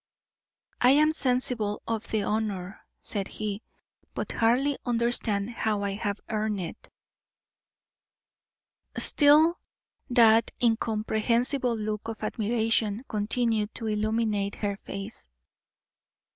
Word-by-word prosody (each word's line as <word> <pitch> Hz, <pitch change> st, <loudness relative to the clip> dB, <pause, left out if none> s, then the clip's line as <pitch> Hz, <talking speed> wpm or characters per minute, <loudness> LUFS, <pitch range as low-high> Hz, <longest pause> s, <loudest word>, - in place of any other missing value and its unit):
"I 245 Hz, -, +6 dB
am 305 Hz, +1 st, +4 dB
sensible 250 Hz, -7 st, 0 dB
of 225 Hz, -1 st, -3 dB
the 215 Hz, -2 st, 0 dB
honour," 205 Hz, -3 st, -2 dB, 0.2 s
said 200 Hz, -3 st, -1 dB
he, 210 Hz, -1 st, -4 dB, 0.5 s
"but -, -, -3 dB
hardly 255 Hz, +5 st, +2 dB
understand 235 Hz, -3 st, 0 dB
how 215 Hz, -3 st, -1 dB
I 200 Hz, -, -1 dB
have 205 Hz, 0 st, -3 dB
earned 215 Hz, -1 st, -1 dB
it." 170 Hz, -3 st, -7 dB, 2.1 s
Still 305 Hz, +3 st, +5 dB, 0.5 s
that 230 Hz, -2 st, +5 dB
incomprehensible 230 Hz, +2 st, +1 dB
look 215 Hz, 0 st, -4 dB
of 225 Hz, -1 st, -6 dB
admiration 220 Hz, 0 st, 0 dB
continued 220 Hz, 0 st, -1 dB
to 225 Hz, -, -3 dB
illumine 215 Hz, -1 st, 0 dB
her 205 Hz, -1 st, -2 dB
face. 195 Hz, +2 st, -8 dB
220 Hz, 100 wpm, -27 LUFS, 210-235 Hz, 2.1 s, I